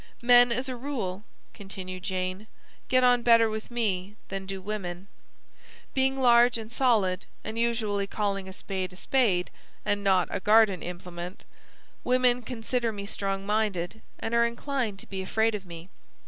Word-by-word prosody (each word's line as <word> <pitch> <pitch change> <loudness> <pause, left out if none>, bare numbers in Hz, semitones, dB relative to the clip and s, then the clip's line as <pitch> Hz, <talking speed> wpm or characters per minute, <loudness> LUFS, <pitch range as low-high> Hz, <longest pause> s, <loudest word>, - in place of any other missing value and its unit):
"Men 245 0 +7
as 250 +3 -1
a 255 - -3
rule," 235 -8 -4 0.3
Continued 190 -3 -7
Jane, 185 +2 -3 0.4
"get 255 0 +3
on 245 -1 +5
better 230 -2 +5
with 220 0 -5
me 205 -5 -1
than 195 0 -5
do 195 0 -4
women. 190 -2 -5 0.9
Being 265 0 +2
large 240 -2 +5
and 220 0 -8
solid, 215 -8 +2 0.2
and 220 +1 -4
usually 220 -4 0
calling 195 -2 -2
a - - -9
spade 190 -1 -4
'a - - -12
spade;' 195 -5 +1 0.3
and 205 -1 0
not 190 -2 +3
'a - - -1
garden 210 -2 +4
implement,' 180 +1 -7 0.6
women 250 -1 +3
consider 235 0 -2
me 200 -2 -6
strong 195 -1 -3
minded, 210 -1 -1 0.2
and 225 - -4
are 235 0 +5
inclined 235 -3 -3
to - - -11
be 190 -1 -5
afraid 220 +4 +1
of 200 -3 -5
me. 170 0 -9
210 Hz, 160 wpm, -27 LUFS, 190-235 Hz, 0.9 s, Men